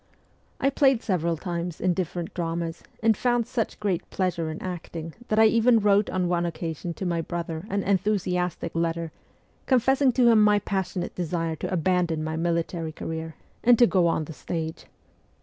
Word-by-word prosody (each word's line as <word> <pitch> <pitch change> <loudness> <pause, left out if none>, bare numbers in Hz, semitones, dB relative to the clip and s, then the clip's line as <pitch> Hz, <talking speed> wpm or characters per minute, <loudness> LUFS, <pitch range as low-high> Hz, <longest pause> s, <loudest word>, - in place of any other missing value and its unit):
I 275 - +2
played 270 -4 +3
several 170 -4 0
times 170 0 -4
in 185 0 +2
different 175 -1 -3
dramas, 165 -1 -3 0.2
and 225 -1 +5
found 240 +1 +1
such 225 -1 -3
great 195 -5 -1
pleasure 170 -4 -1
in 155 - -5
acting 165 -3 -6
that 215 - 0
I 220 - +7
even 230 +2 +5
wrote 205 0 +3
on 185 -1 0
one 175 -1 +1
occasion 170 0 -4
to 190 - -5
my 170 -2 0
brother 170 +1 -5
an 200 0 -1
enthusiastic 180 -3 0
letter 165 -1 -1 0.6
confessing 265 +1 +4
to 240 -2 +5
him 220 -2 +6
my 210 0 +5
passionate 190 -3 -2
desire 165 -2 -2
to - - -4
abandon 175 -2 +1
my 160 0 -3
military 165 0 -1
career 160 0 -5 0.3
and 240 0 +6
to 240 - +7
go 185 -6 +3
on 160 -2 0
the 160 - -8
stage. 160 0 -5
175 Hz, 170 wpm, -26 LUFS, 165-205 Hz, 0.6 s, I